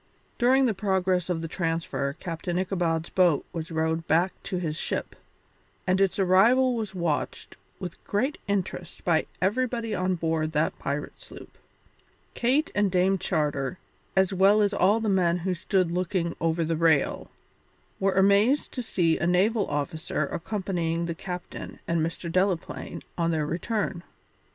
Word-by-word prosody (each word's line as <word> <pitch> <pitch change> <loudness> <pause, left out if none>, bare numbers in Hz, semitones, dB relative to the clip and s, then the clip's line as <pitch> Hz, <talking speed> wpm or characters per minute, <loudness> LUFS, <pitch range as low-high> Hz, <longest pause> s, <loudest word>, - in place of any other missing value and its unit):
During 260 +2 +4
the 230 - +2
progress 185 -2 0
of 165 -2 -1
the - - -2
transfer 165 -5 -2
Captain 170 +2 -4
Ichabod's 175 -3 -1
boat 175 -6 +3
was 165 -1 -4
rowed 160 0 -1
back 175 +4 +3
to 195 -2 -4
his 160 -4 -2
ship, - - -3 0.7
and 185 +1 +2
its 195 -2 +2
arrival 225 +8 +4
was 215 -5 -4
watched 170 -4 -2 0.2
with 180 -3 -7
great 260 +9 -1
interest 185 -3 -3
by 165 -3 +2 0.2
everybody 235 +2 0
on 185 -1 0
board 160 -2 -1
that 150 +1 0
pirate 145 - -4
sloop. - - -12 0.8
Kate 265 +6 +1
and 205 -1 +2
Dame 185 +1 +2
Charter, 150 -4 -1 0.4
as 190 0 +3
well 200 +3 +5
as 205 0 +1
all 200 +4 +3
the 225 - -2
men 180 -3 +3
who 180 +2 -1
stood 180 0 0
looking 175 -1 -1
over 165 0 +1
the 165 +1 0
rail, 160 -3 +2 0.7
were 195 0 +2
amazed 200 +8 +3
to 255 - -4
see 170 -8 +1
a 170 - 0
naval 200 +4 +2
officer 155 +3 -2
accompanying 170 -3 -2
the 170 - -2
captain 180 +1 -7
and 170 -1 +1
Mr. 165 +2 -3
Delaplaine 185 0 -1 0.2
on 165 0 +2
their 155 -2 0
return. 180 +3 -2
180 Hz, 150 wpm, -26 LUFS, 165-195 Hz, 0.8 s, well